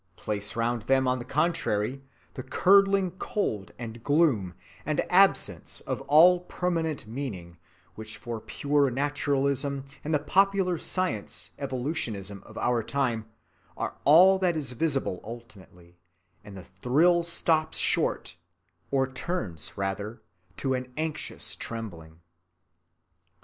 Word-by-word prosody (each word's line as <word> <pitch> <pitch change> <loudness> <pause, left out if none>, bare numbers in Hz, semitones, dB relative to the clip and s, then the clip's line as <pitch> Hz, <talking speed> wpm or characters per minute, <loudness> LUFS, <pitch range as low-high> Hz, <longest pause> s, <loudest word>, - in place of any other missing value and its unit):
Place 105 +1 -3
round 115 0 0
them 130 -1 +4
on 125 0 +1
the 120 - -7
contrary 135 -5 0 0.3
the - - -6
curdling 195 +6 +4
cold 110 - -2
and 115 -1 -8
gloom 140 - +2 0.3
and - - -1
absence - - +3
of - - -4
all 170 +5 +7
permanent 165 -5 -2
meaning 105 -9 -6 0.3
which 110 0 -8
for 120 -3 -5
pure 145 +2 +1
naturalism 140 0 0 0.2
and 155 - -3
the 155 - +4
popular 190 +1 +2
science 185 - -2
evolutionism 120 - -3
of - - -12
our 120 -1 +1
time 115 -3 -1 0.5
are - - -3
all 185 +7 +7
that 180 -3 +1
is 140 -4 -2
visible 135 - -1
ultimately, 95 -7 -12 0.4
and 100 -2 -11
the 90 - -10
thrill 145 - +2
stops 165 -2 +1
short, - - 0 0.5
or 135 -1 +2
turns 130 - -4
rather 100 +3 -4 0.3
to 135 -1 -1
an 130 0 -4
anxious 155 -1 -3
trembling. 85 -8 -7
130 Hz, 120 wpm, -27 LUFS, 110-160 Hz, 0.5 s, all